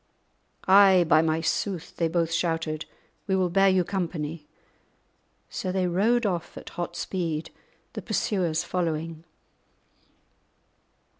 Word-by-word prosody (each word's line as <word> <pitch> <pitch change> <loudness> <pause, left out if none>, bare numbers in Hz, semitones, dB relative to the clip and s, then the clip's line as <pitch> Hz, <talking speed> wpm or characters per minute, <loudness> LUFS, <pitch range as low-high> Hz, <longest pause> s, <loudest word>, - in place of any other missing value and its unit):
"Ay, 190 -2 +7
by 160 -1 +5
my 160 0 0
sooth," 180 +1 -2
they 165 - +1
both 165 0 0
shouted, 165 -2 -1 0.4
"we 190 - +1
will 185 -2 +1
bear 195 +2 +5
you 185 -1 +3
company." 165 -5 -4 1.0
So 185 - -4
they 185 0 0
rode 215 +7 +2
off 175 -4 -2
at - - -9
hot 175 -2 -5
speed, 165 -4 -3 0.4
the - - -5
pursuers 175 -7 -1
following. 165 -2 -3
175 Hz, 120 wpm, -26 LUFS, 160-190 Hz, 1.0 s, Ay